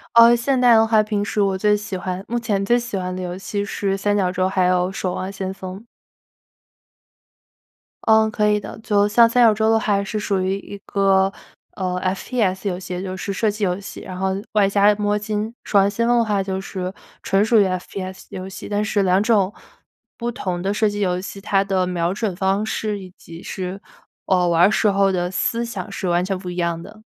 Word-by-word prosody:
呃， 235 +1 +8
现 255 +3 0
在 245 -2 +6
的 225 0 +6
话 220 -1 +4
平 210 -1 -1
时 210 0 -1
我 195 -1 +1
最 210 +2 +3
喜 210 -1 -6
欢 185 +1 -4
目 240 +1 -1
前 210 -4 -1
最 240 +4 +3
喜 235 -4 -4
欢 180 0 -3
的 185 - -5
游 180 0 -4
戏 200 +1 -3
是 200 -1 -2
《三 205 +1 0
角 185 -3 +1
洲》， 185 0 0
还 185 -1 +1
有 180 0 +2
《守 185 -1 -3
望 185 +1 -4
先 190 -1 -4
锋》。 190 0 -8 2.3
嗯， 220 0 +5
可 210 0 +1
以 210 0 +2
的， 195 - -9
就 205 -2 +2
像 230 +3 +6
三 245 +1 +3
角 225 -2 +6
洲 220 +1 +1
的 225 - +4
话 200 -2 +1
是 215 +2 -3
属 205 -2 -1
于 190 +1 0
一 200 - -9
个 195 -1 +2 0.4
呃 185 -2 -2
，F-P-S 190 +1 -1
游 180 -1 -3
戏， 180 -1 -5
就 185 -1 -5
是 200 +1 -4
射 215 +3 +1
击 210 +1 -5
游 180 0 -1
戏， 200 - -9
然 185 -1 -8
后 190 +1 0 0.2
外 205 -2 +4
加 205 +1 +4
摸 205 0 0
金。 215 +1 -3
守 205 - +1
望 195 +1 +4
先 230 +3 -1
锋 240 0 +4
的 230 - +3
话 205 -3 0
就 190 0 -3
是 185 -1 -5 0.3
纯 195 +1 +2
属 220 0 +4
于 200 - +5
F-P-S 185 +1 -5
游 185 0 -6
戏， 190 - -9
但 205 0 0
是 205 -2 +1
两 185 +1 +3
种 210 -3 +2 0.6
不 240 0 -3
同 180 -7 -4
的 195 +2 -1
射 215 0 +2
击 205 0 -5
游 180 -2 +1
戏， 195 +1 -8
它 195 -1 +2
的 190 -2 0
瞄 175 0 -1
准 210 -2 -2
方 195 +2 0
式 215 -2 -2
以 185 -1 -11
及 165 0 -11
是 185 +1 -5 0.4
呃， 180 -2 +2
玩 170 0 +3
儿 200 - +6
时 215 - +2
候 195 -1 +3
的 180 -1 -1
思 230 +5 -1
想 210 -3 -6
是 195 -1 -4
完 175 0 +2
全 190 0 -2
不 185 -1 -7
一 175 - -6
样 170 -1 -1
的。 210 +5 -13
195 Hz, 250 characters per minute, -21 LUFS, 185-210 Hz, 2.3 s, 呃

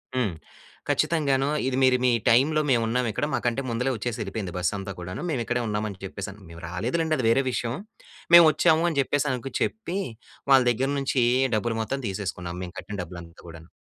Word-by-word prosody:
హ్మ్. 120 -8 0 0.6
ఖచ్చితంగానో, 140 -4 +1 0.2
"ఇది 130 -1 0
మీరు 130 -1 +5
మీ 125 - +4 0.2
టైమ్‌లో 145 +7 +4
మేము 120 -3 +3
ఉన్నాము 120 0 0
ఇక్కడ, 105 - -1
మాకంటే 120 +1 0
ముందలే 125 +3 0
వచ్చేసెళ్ళిపోయింది 105 -4 -4
బస్ 90 0 0
అంతా 100 0 -5
కూడాను. 90 +1 -6
మేము 135 -7 -1
ఇక్కడే 120 0 -1
ఉన్నాం 105 0 -1
అని 95 - -10
చెప్పేసి." 95 0 -6 0.2
మేము 85 0 -11
రాలేదు 110 - -2
లెండి, 160 -1 +1
అది 125 - -1
వేరే 135 +4 +3
విషయం. 120 -1 -2 0.6
"మేము 170 -1 +10
వచ్చాము," 165 +1 +3
అని 155 -4 -1
చెప్పేసి 145 +2 0
అనకు 130 +1 -4
చెప్పి, 195 -4 -2 0.5
వాళ్ళ 135 -1 +8
దగ్గర 130 +4 -1
నుంచి, 135 -2 +1 0.3
డబ్బులు 115 +1 -1
మొత్తం 135 +6 -3
తీసేసుకున్నాం. 90 -3 -4
మేము 90 +1 -8
కట్టిన 105 - -7
డబ్బులంతా 85 0 -11
కూడాను. 85 0 -12
120 Hz, 180 wpm, -25 LUFS, 100-135 Hz, 0.6 s, మేము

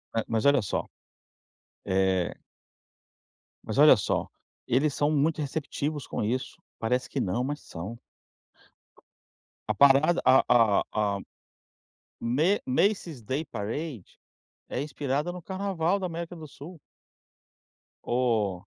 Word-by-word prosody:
Eh, 115 - +1
mas 115 +1 -1
olha 140 -2 +5
só. 100 - -2 1.0
Eh 95 -1 +1 1.3
Mas - - -4
olha - - +9
só, - - -1 0.4
eles 140 +4 +2
são 145 +2 +1
muito 155 +1 +1
receptivos 145 0 -3
com - - -3
isso. 125 +5 -3 0.2
Parece 125 +3 0
que 140 - -3
não, 120 +2 0
mas 145 +3 -3
são. 100 +8 -8 1.7
A - - +3
parada, 140 +8 +5
a 130 +1 +6
a 115 -4 +5
a 105 -2 +1
a - - -7 1.0
Ma 150 +12 +2
Macie's 165 - 0
Day 135 +8 -3
Parade 115 - -6 0.5
é - - -3
inspirada 145 +3 -2
no 180 -1 -8
carnaval 190 -1 -1
da 190 - -3
América 170 +1 -6
do 160 -2 -9
Sul. 150 +5 -11 1.2
O 110 -7 0
135 Hz, 120 wpm, -27 LUFS, 115-160 Hz, 1.7 s, olha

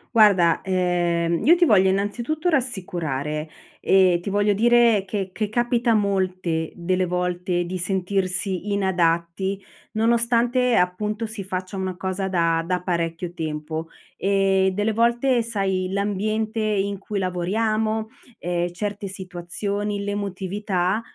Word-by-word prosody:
Guarda, 190 -6 +5
ehm, 175 -2 0
io 335 - +7
ti 355 - +2
voglio 195 - +5
innanzitutto 235 - -1
rassicurare 165 - -2 0.3
e 185 -2 +4
ti 200 - -4
voglio 205 +1 +2
dire 230 -1 +4
che 195 -1 -3
che 215 +2 -2
capita 240 +1 +1
molte 185 -5 0
delle 185 +1 0
volte 180 0 -1
di 180 +2 -4
sentirsi 190 +1 -1
inadatti, 190 0 0 0.3
nonostante 235 +2 +2
appunto 210 +5 0
si 215 -3 -7
faccia 185 +1 -4
una 190 -1 -3
cosa 190 +1 -3
da 165 -3 +1
da 180 0 0
parecchio 170 -1 -2
tempo. 155 0 -4 0.3
Ehm, 195 0 +2
delle 205 +3 0
volte 235 +3 +2
sai, 195 -4 -1
l'ambiente 215 +2 -1
in 200 -2 0
cui 200 +2 -5
lavoriamo, 215 +4 -1 0.3
ehm, 175 0 -1
certe 205 +2 -4
situazioni, 200 +2 -4
l'emotività, 200 -1 -2
195 Hz, 120 wpm, -23 LUFS, 180-215 Hz, 0.3 s, io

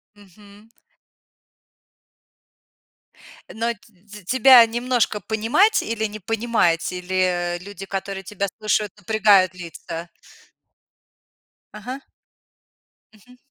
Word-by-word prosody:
Мгм. 205 +2 -19 2.8
Но 230 +2 -1
т 210 -2 -17
тебя 255 +1 +7
немножко 240 -2 -1
понимать 230 - +2
или 220 -1 -3
не 215 0 -6
понимать, 215 -6 0
или 180 -1 -1
люди, 195 0 -9
которые 195 0 -5
тебя 200 0 -3
слушают, 210 -1 0
напрягают 205 -2 +3
лица? 170 -1 -8 1.7
Ага. 250 +6 -8 1.1
Мгм. 250 +4 -20
210 Hz, 80 wpm, -22 LUFS, 185-225 Hz, 2.8 s, тебя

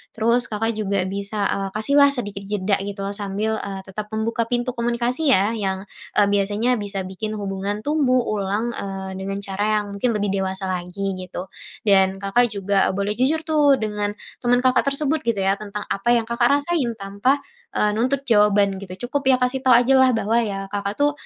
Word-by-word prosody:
Terus 235 +2 +2
Kakak 225 +2 -1
juga 200 -3 0
bisa, 200 +1 -2
eee, 195 0 -2
kasihlah 280 +6 +4
sedikit 205 -7 -2
jeda 200 -1 +1
gitu 200 0 -6
loh, 200 +1 -3
sambil, 205 +2 -2
eee, 195 -1 -5
tetap 210 +2 -7
membuka 225 +2 -1
pintu 245 +1 -1
komunikasi 240 +5 +1
ya, 210 0 +3
yang, 195 -2 -3 0.3
eee, 205 - +5
biasanya 205 +5 +1
bisa 200 -3 -3
bikin 200 +3 -5
hubungan 200 +1 -3
tumbuh 265 0 +2
ulang, 210 +3 -1
eee, 195 -1 -5
dengan 195 +1 -4
cara 195 +1 -3 0.2
yang 205 - -8
mungkin 235 +4 +1
lebih 205 -2 -1
dewasa 190 0 -3
lagi, 185 +2 -3
gitu. 185 0 -7 0.3
Dan, 195 -3 +3
Kakak 235 +4 +2
juga 200 -1 +1
boleh 200 +2 -1
jujur 270 +7 +2
tuh 295 -3 +4
dengan, 210 -1 -2 0.3
teman 245 0 +3
Kakak 255 +1 +3
tersebut 295 +2 -1
gitu 230 -4 0
ya, 195 0 +2
tentang 210 0 -6
apa 220 +5 0
yang 230 -2 +1
Kakak 235 +1 +2
rasain, 285 -5 -1
tanpa, 200 +8 0 0.3
eee, 210 0 +2
nuntut 260 +5 0
jawaban 205 -3 +4
gitu. 195 +5 -7
Cukup 275 +1 0
ya 255 - +4
kasih 255 +1 0
tau 255 - +7
ajalah, 260 +2 +5
bahwa 225 0 +1
ya, 195 -2 -4
Kakak 200 0 -3
tuh, 290 0 +4
210 Hz, 185 wpm, -22 LUFS, 195-245 Hz, 0.3 s, tau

